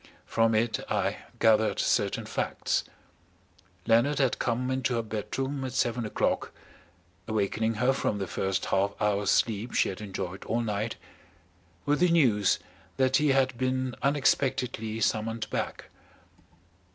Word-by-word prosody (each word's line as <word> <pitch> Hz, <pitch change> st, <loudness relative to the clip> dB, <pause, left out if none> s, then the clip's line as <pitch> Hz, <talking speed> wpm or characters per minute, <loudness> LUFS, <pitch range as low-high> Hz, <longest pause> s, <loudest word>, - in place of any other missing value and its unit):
From 115 Hz, -1 st, +2 dB
it 110 Hz, +1 st, +1 dB
I -, -, 0 dB, 0.2 s
gathered 110 Hz, -1 st, +3 dB
certain -, -, +1 dB
facts. -, -, -1 dB, 1.0 s
Leonard 120 Hz, +6 st, +3 dB
had 135 Hz, -3 st, +1 dB
come 125 Hz, +2 st, -1 dB
into 130 Hz, -1 st, 0 dB
her 115 Hz, -, 0 dB
bedroom 120 Hz, +6 st, -3 dB
at 130 Hz, -1 st, -4 dB
seven 120 Hz, -2 st, 0 dB
o'clock, -, -, -1 dB, 0.8 s
awakening 110 Hz, +1 st, 0 dB
her 125 Hz, +5 st, +2 dB
from 110 Hz, -5 st, -1 dB
the 100 Hz, -, -2 dB
first 95 Hz, +1 st, -2 dB
half 100 Hz, +1 st, 0 dB
hour's 105 Hz, -2 st, +1 dB
sleep 110 Hz, +1 st, +1 dB
she -, -, +3 dB
had 95 Hz, +2 st, -6 dB
enjoyed 95 Hz, -2 st, -5 dB
all 115 Hz, +1 st, 0 dB
night, 110 Hz, 0 st, -2 dB, 0.9 s
with 145 Hz, +1 st, +2 dB
the 180 Hz, 0 st, +4 dB
news 120 Hz, -, +3 dB, 0.4 s
that 130 Hz, -1 st, +3 dB
he 150 Hz, -, +2 dB
had 135 Hz, -2 st, +2 dB
been 130 Hz, 0 st, 0 dB
unexpectedly 130 Hz, -5 st, +1 dB
summoned 110 Hz, +2 st, 0 dB
back. -, -, -4 dB
115 Hz, 135 wpm, -28 LUFS, 105-130 Hz, 1.0 s, the